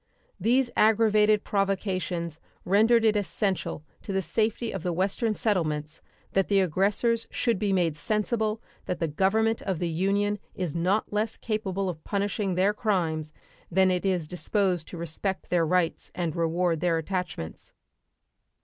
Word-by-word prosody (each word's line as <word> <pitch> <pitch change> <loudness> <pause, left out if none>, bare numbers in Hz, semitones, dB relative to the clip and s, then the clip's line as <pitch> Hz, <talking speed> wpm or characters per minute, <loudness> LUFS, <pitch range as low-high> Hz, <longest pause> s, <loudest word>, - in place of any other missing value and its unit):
These 240 +5 +2
aggravated 215 -1 +4
provocations 185 -5 -1 0.3
rendered 225 +5 +4
it 215 -1 +4
essential 195 -5 -1 0.2
to - - -6
the 190 0 0
safety 220 +7 0
of 195 - -4
the 180 - -1
Western 200 +5 0
settlements 155 -8 -1 0.3
that 195 -1 +2
the 200 -1 +3
aggressors 200 +6 +1
should 235 -5 0
be 205 -1 0
made 175 -5 +2
sensible 215 +5 -1 0.2
that 180 - -1
the 165 - 0
Government 220 +8 +1
of 190 -3 -2
the 175 - -1
Union 200 +5 0 0.2
is 180 -5 -3
not 185 +6 0
less 215 +1 -1
capable 195 -3 -2
of 160 -4 -5
punishing 200 -1 -1
their 190 +3 +3
crimes 165 -8 -1 0.4
than 190 +1 +4
it 180 -1 0
is 180 -5 0
disposed 180 0 0
to 175 - -8
respect 170 +4 -4
their 170 -2 +3
rights 180 -1 0
and 170 -3 -2
reward 170 0 +1
their 170 -1 +1
attachments. 175 - -4
190 Hz, 150 wpm, -27 LUFS, 170-210 Hz, 0.4 s, aggravated